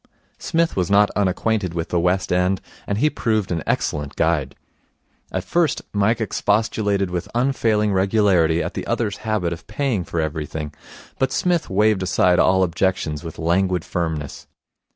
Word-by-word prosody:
Psmith 165 Hz, 0 st, 0 dB
was 90 Hz, -1 st, 0 dB
not 100 Hz, +1 st, +4 dB
unacquainted 100 Hz, -1 st, 0 dB
with 80 Hz, -1 st, -3 dB
the 85 Hz, -, +1 dB
West 90 Hz, +2 st, +1 dB
End, 90 Hz, +1 st, +2 dB, 0.3 s
and 100 Hz, -, -1 dB
he 150 Hz, -, +3 dB
proved 110 Hz, -9 st, -1 dB
an 85 Hz, -2 st, -1 dB
excellent 75 Hz, 0 st, -1 dB
guide. 75 Hz, -5 st, 0 dB, 0.8 s
At 95 Hz, -, -2 dB
first 160 Hz, -, 0 dB
Mike 105 Hz, +3 st, +2 dB
expostulated 105 Hz, -2 st, 0 dB
with 90 Hz, +3 st, -3 dB
unfailing 115 Hz, -5 st, +1 dB
regularity 95 Hz, -4 st, +3 dB
at -, -, -4 dB
the -, -, -5 dB
other's 105 Hz, -4 st, -1 dB
habit 105 Hz, -6 st, -1 dB
of 85 Hz, -, -11 dB
paying 110 Hz, -3 st, -1 dB
for 85 Hz, -, -4 dB
everything, 80 Hz, -1 st, -3 dB, 0.5 s
but 130 Hz, -, +1 dB
Psmith 175 Hz, -2 st, 0 dB
waved 105 Hz, 0 st, +2 dB
aside 90 Hz, -1 st, +3 dB
all 95 Hz, 0 st, +4 dB
objections 90 Hz, -3 st, -1 dB
with 80 Hz, -2 st, -8 dB
languid 90 Hz, +1 st, +1 dB
firmness. 80 Hz, -5 st, -4 dB
95 Hz, 155 wpm, -21 LUFS, 85-105 Hz, 0.8 s, not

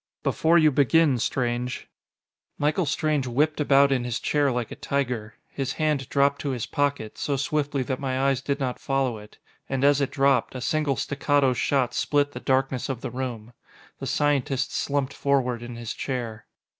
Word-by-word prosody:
"Before 165 Hz, +2 st, +3 dB
you 155 Hz, -2 st, +5 dB
begin, 145 Hz, 0 st, +3 dB
Strange 120 Hz, +1 st, -2 dB, 0.4 s
" -, -, -68 dB, 0.3 s
Michael 150 Hz, +3 st, +1 dB
Strange 145 Hz, -1 st, 0 dB
whipped 150 Hz, +6 st, +1 dB
about 140 Hz, -1 st, +5 dB
in 130 Hz, -3 st, +1 dB
his 120 Hz, -2 st, -2 dB
chair 145 Hz, -2 st, +1 dB
like 120 Hz, -2 st, -3 dB
a -, -, -5 dB
tiger. 125 Hz, -5 st, -2 dB, 0.2 s
His 135 Hz, -2 st, -3 dB
hand 150 Hz, -4 st, -1 dB
dropped 140 Hz, 0 st, +2 dB
to 145 Hz, -, -2 dB
his 115 Hz, -, -3 dB
pocket, 140 Hz, -7 st, -2 dB
so 140 Hz, -2 st, -1 dB
swiftly 145 Hz, -1 st, -1 dB
that 130 Hz, 0 st, -3 dB
my 130 Hz, -2 st, -2 dB
eyes 135 Hz, -1 st, +1 dB
did 140 Hz, 0 st, -2 dB
not 130 Hz, -3 st, -2 dB
follow 135 Hz, -5 st, -1 dB
it. 105 Hz, 0 st, -15 dB, 0.3 s
And 135 Hz, 0 st, -1 dB
as 145 Hz, 0 st, +4 dB
it 140 Hz, -, +1 dB
dropped, 135 Hz, -1 st, +2 dB
a -, -, -3 dB
single 150 Hz, 0 st, 0 dB
staccato 145 Hz, 0 st, +1 dB
shot 125 Hz, -1 st, +1 dB
split 145 Hz, +3 st, +1 dB
the -, -, -7 dB
darkness 130 Hz, -1 st, 0 dB
of 130 Hz, -3 st, -3 dB
the -, -, -5 dB
room. 120 Hz, -3 st, -5 dB, 0.5 s
The -, -, -5 dB
scientist 140 Hz, -2 st, 0 dB
slumped 140 Hz, -1 st, -1 dB
forward 125 Hz, -4 st, 0 dB
in 120 Hz, 0 st, -7 dB
his 115 Hz, -1 st, -5 dB
chair. 120 Hz, -5 st, -4 dB
135 Hz, 180 wpm, -25 LUFS, 125-145 Hz, 0.5 s, you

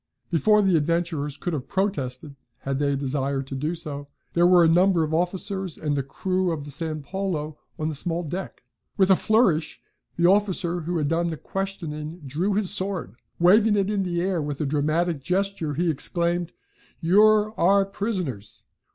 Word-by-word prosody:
Before 210 Hz, +6 st, +4 dB
the 190 Hz, -4 st, +4 dB
adventurers 160 Hz, -2 st, -1 dB
could 175 Hz, -, -3 dB
have 135 Hz, -4 st, -4 dB
protested, 145 Hz, -8 st, -2 dB, 0.3 s
had 135 Hz, 0 st, -2 dB
they 140 Hz, -1 st, +1 dB
a -, -, 0 dB
desire 135 Hz, 0 st, -1 dB
to 135 Hz, -, -9 dB
do 150 Hz, +6 st, -2 dB
so, 145 Hz, -3 st, -6 dB, 0.3 s
there 175 Hz, +1 st, +4 dB
were 180 Hz, -1 st, +6 dB
a -, -, +5 dB
number 175 Hz, +1 st, +4 dB
of 155 Hz, 0 st, -3 dB
officers 185 Hz, +1 st, -2 dB
and 150 Hz, -2 st, -1 dB
the 140 Hz, -, 0 dB
crew 185 Hz, +6 st, -1 dB
of 150 Hz, -3 st, -4 dB
the 145 Hz, -, -5 dB
San 155 Hz, +1 st, -3 dB
Paulo 165 Hz, -2 st, -3 dB, 0.2 s
on 155 Hz, -, -2 dB
the 160 Hz, -, -2 dB
small 170 Hz, +4 st, -1 dB
deck. 175 Hz, 0 st, -6 dB, 0.3 s
With 190 Hz, -1 st, +4 dB
a -, -, +8 dB
flourish, 195 Hz, -8 st, +2 dB, 0.4 s
the 170 Hz, -, +1 dB
officer 185 Hz, -2 st, +2 dB
who 170 Hz, +2 st, -2 dB
had 150 Hz, -2 st, 0 dB
done 165 Hz, +2 st, +1 dB
the 160 Hz, -2 st, -3 dB
questioning 165 Hz, -3 st, -5 dB
drew 170 Hz, +9 st, -1 dB
his 205 Hz, -3 st, +1 dB
sword. 185 Hz, -, 0 dB, 0.2 s
Waving 210 Hz, +5 st, +5 dB
it 200 Hz, 0 st, +1 dB
in 205 Hz, -2 st, 0 dB
the 175 Hz, -2 st, -1 dB
air 185 Hz, -2 st, 0 dB
with 145 Hz, -1 st, -4 dB
a 150 Hz, -, -1 dB
dramatic 155 Hz, +2 st, 0 dB
gesture, 180 Hz, -2 st, -1 dB
he 170 Hz, +2 st, +1 dB
exclaimed: 170 Hz, +3 st, -1 dB, 0.5 s
"You're 210 Hz, +4 st, +4 dB
our 195 Hz, +3 st, +4 dB
prisoners! 185 Hz, -, -4 dB
170 Hz, 180 wpm, -24 LUFS, 150-190 Hz, 0.5 s, a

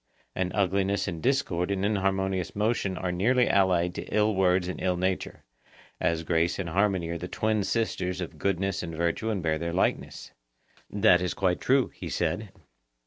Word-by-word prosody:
And 90 Hz, -1 st, -1 dB
ugliness 100 Hz, 0 st, +1 dB
and 85 Hz, -4 st, -4 dB
discord 95 Hz, -, 0 dB
and 100 Hz, 0 st, 0 dB
inharmonious 95 Hz, -3 st, 0 dB
motion 105 Hz, -3 st, 0 dB
are 90 Hz, -1 st, -2 dB
nearly 120 Hz, +8 st, +2 dB
allied 90 Hz, -3 st, +2 dB
to -, -, -5 dB
ill 105 Hz, 0 st, +1 dB
words 90 Hz, -1 st, +2 dB
and 90 Hz, -, -5 dB
ill 90 Hz, -1 st, 0 dB
nature, 95 Hz, +1 st, -2 dB, 0.6 s
as 80 Hz, 0 st, 0 dB
grace 85 Hz, +1 st, +1 dB
and 95 Hz, -3 st, -3 dB
harmony 95 Hz, -1 st, +1 dB
are 85 Hz, 0 st, -3 dB
the 90 Hz, -, -5 dB
twin 110 Hz, +2 st, 0 dB
sisters 95 Hz, -5 st, -1 dB
of 90 Hz, -, -6 dB
goodness 95 Hz, -1 st, 0 dB
and 85 Hz, -2 st, -6 dB
virtue 85 Hz, +7 st, -1 dB
and 100 Hz, -5 st, -2 dB
bear 80 Hz, -1 st, 0 dB
their 85 Hz, +1 st, -3 dB
likeness. 95 Hz, -, -1 dB, 0.6 s
That 100 Hz, -3 st, +4 dB
is 90 Hz, -, -2 dB
quite 90 Hz, -2 st, 0 dB
true, 135 Hz, 0 st, +3 dB
he -, -, -7 dB
said. 90 Hz, +5 st, -2 dB
95 Hz, 175 wpm, -27 LUFS, 90-100 Hz, 0.6 s, That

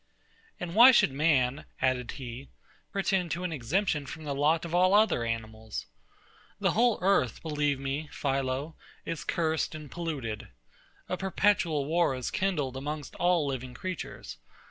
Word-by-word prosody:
And 170 Hz, -1 st, -5 dB
why 235 Hz, +5 st, +10 dB
should 225 Hz, -, +4 dB
man, 140 Hz, -2 st, +2 dB
added 130 Hz, -2 st, 0 dB
he, 130 Hz, +1 st, -8 dB, 0.4 s
pretend 190 Hz, -3 st, 0 dB
to 175 Hz, +2 st, -4 dB
an 180 Hz, -, -2 dB
exemption 150 Hz, -, 0 dB
from 160 Hz, +2 st, -8 dB
the 145 Hz, -2 st, -3 dB
lot 155 Hz, +4 st, +2 dB
of 170 Hz, -, -6 dB
all 185 Hz, +2 st, +5 dB
other 210 Hz, -, +4 dB
animals? 110 Hz, -1 st, -4 dB, 0.7 s
The -, -, +2 dB
whole 235 Hz, 0 st, +3 dB
earth, 185 Hz, -, +2 dB
believe 145 Hz, -3 st, 0 dB
me, 140 Hz, +3 st, -3 dB
PHILO, 135 Hz, +2 st, -1 dB, 0.3 s
is 165 Hz, -2 st, -4 dB
cursed 160 Hz, -3 st, 0 dB
and 150 Hz, -3 st, -9 dB
polluted. 145 Hz, -11 st, -4 dB, 0.6 s
A 185 Hz, -, -2 dB
perpetual 190 Hz, -6 st, +1 dB
war 165 Hz, -2 st, +2 dB
is 130 Hz, -2 st, -4 dB
kindled 150 Hz, -9 st, -1 dB
amongst 145 Hz, +1 st, -5 dB
all 175 Hz, -3 st, +3 dB
living 130 Hz, -2 st, -4 dB
creatures. 185 Hz, +5 st, -6 dB
150 Hz, 145 wpm, -29 LUFS, 130-175 Hz, 0.7 s, why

